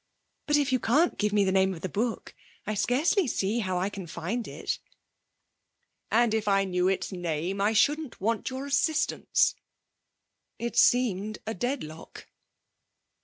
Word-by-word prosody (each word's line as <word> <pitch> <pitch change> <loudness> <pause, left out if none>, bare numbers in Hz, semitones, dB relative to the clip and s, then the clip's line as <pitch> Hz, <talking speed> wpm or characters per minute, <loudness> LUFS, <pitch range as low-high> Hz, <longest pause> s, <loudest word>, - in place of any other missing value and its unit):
'But 295 0 +4
if 285 -2 +1
you 255 - +2
can't 290 +11 +2
give 210 0 +1
me 205 -1 +3
the 190 - +1
name 190 0 +2
of 160 - -11
the 185 - -2
book 225 +5 -3 0.3
I 215 - -2
scarcely 295 - +2
see 210 0 0
how 185 -4 -1
I 185 +3 0
can 195 -3 -7
find 190 +9 -4
it.' - - -4 1.3
'And 235 0 +3
if 220 -1 -1
I 195 -1 +3
knew 180 -1 0
its 195 +2 -1
name 175 +1 -2
I 210 +2 +2
shouldn't 295 +5 +1
want 225 +3 -1
your 260 +1 -5
assistance.' 280 +3 +1 1.0
It 235 0 -4
seemed 215 -4 +3
a 220 - -3
deadlock. 180 - -5
215 Hz, 155 wpm, -28 LUFS, 190-250 Hz, 1.3 s, But